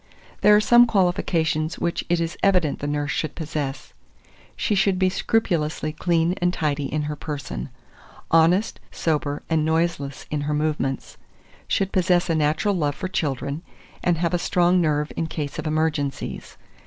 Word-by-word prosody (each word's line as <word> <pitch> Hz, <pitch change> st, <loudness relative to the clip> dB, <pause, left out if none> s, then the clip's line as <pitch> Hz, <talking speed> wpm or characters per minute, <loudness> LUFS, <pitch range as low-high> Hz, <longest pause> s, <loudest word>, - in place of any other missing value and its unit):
There 210 Hz, 0 st, +7 dB
are -, -, +6 dB
some 240 Hz, +3 st, +6 dB
qualifications 170 Hz, -5 st, +1 dB
which 170 Hz, -, -1 dB
it 175 Hz, 0 st, +2 dB
is 165 Hz, -1 st, -2 dB
evident 180 Hz, -7 st, +2 dB
the 145 Hz, -, -3 dB
nurse 145 Hz, -1 st, -1 dB
should 155 Hz, +2 st, -2 dB
possess: 150 Hz, -4 st, -4 dB, 0.6 s
she -, -, 0 dB
should 195 Hz, -1 st, +2 dB
be 185 Hz, 0 st, +3 dB
scrupulously 160 Hz, -8 st, 0 dB
clean 170 Hz, +1 st, +1 dB
and 175 Hz, 0 st, +3 dB
tidy 145 Hz, -5 st, -2 dB
in 150 Hz, +1 st, -1 dB
her 150 Hz, 0 st, -3 dB
person; 145 Hz, -2 st, -5 dB, 0.6 s
honest, 175 Hz, +7 st, +3 dB
sober, 145 Hz, -3 st, -1 dB
and 160 Hz, -2 st, +1 dB
noiseless 160 Hz, -3 st, -1 dB
in 150 Hz, -1 st, -1 dB
her 150 Hz, +1 st, -1 dB
movements; 150 Hz, -3 st, -2 dB, 0.5 s
should 195 Hz, 0 st, 0 dB
possess 180 Hz, -2 st, +2 dB
a -, -, +2 dB
natural 155 Hz, +7 st, +1 dB
love 150 Hz, -6 st, 0 dB
for -, -, -4 dB
children, 145 Hz, -4 st, -2 dB, 0.4 s
and 175 Hz, -2 st, +2 dB
have 170 Hz, +1 st, 0 dB
a 175 Hz, -, +2 dB
strong 175 Hz, +1 st, +3 dB
nerve 150 Hz, -2 st, 0 dB
in 165 Hz, -, -1 dB
case 150 Hz, -3 st, -5 dB
of -, -, -3 dB
emergencies. 155 Hz, -2 st, -2 dB
160 Hz, 160 wpm, -23 LUFS, 150-180 Hz, 0.6 s, There